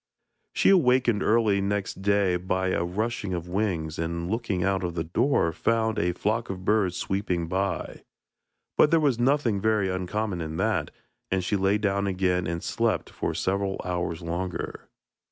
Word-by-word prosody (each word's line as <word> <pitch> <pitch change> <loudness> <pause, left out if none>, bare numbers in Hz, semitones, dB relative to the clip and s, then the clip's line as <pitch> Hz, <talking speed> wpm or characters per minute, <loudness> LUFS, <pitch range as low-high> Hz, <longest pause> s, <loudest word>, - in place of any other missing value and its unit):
She - - +5
was 185 - +6
awakened 125 -5 +3
early 110 -3 +3
next 100 -1 -2
day 100 -2 +2
by 95 +1 -1
a 85 - 0
rushing 100 +1 -2
of 85 0 -5
wings, 90 -5 -2
and, 85 +2 -2
looking 110 -6 -1
out 95 0 +1
of 85 -1 -3
the 80 - -1
door, 85 - +1
found 110 +5 +1
a 90 +1 +1
flock 110 +6 -1
of 95 -1 -6
birds 100 -4 +2
sweeping 90 -4 -1
by. 95 +3 -2 0.8
But - - +7
there 165 - +4
was 140 -6 +2
nothing 120 -5 +2
very 105 -2 +2
uncommon 95 +1 -2
in 80 0 -4
that, - - 0 0.4
and 95 0 0
she 100 - 0
lay 95 +1 +2
down 100 -1 0
again 90 -2 0
and 85 0 -3
slept - - -1
for - - -3
several 95 0 -1
hours 90 -2 -2
longer. 85 +2 -4
95 Hz, 170 wpm, -26 LUFS, 90-110 Hz, 0.8 s, But